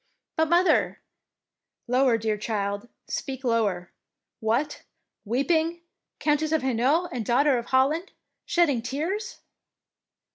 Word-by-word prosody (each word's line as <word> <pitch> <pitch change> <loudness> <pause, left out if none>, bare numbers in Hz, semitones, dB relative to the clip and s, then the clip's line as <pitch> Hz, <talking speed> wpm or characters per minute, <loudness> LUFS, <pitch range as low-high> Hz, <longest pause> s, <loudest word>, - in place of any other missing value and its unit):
" - - -61
But, 320 -1 +2
mother 350 +2 +3 0.3
— - - -63
" - - -59
"Lower, 255 -3 +4
dear 220 -1 -1
child, 205 +1 -3 0.2
speak 265 -1 -4
lower. 210 -7 0 0.5
What! 240 +7 0 0.4
weeping? 320 +8 +1 0.4
Countess 300 +1 +1
of 315 -4 +1
Hainault 265 +8 +2
and 245 -3 -3
Daughter 265 +5 +3
of 235 - -8
Holland 285 +8 +2 0.3
shedding 300 -9 +2
tears? 325 - -3
265 Hz, 120 wpm, -26 LUFS, 230-315 Hz, 0.5 s, Lower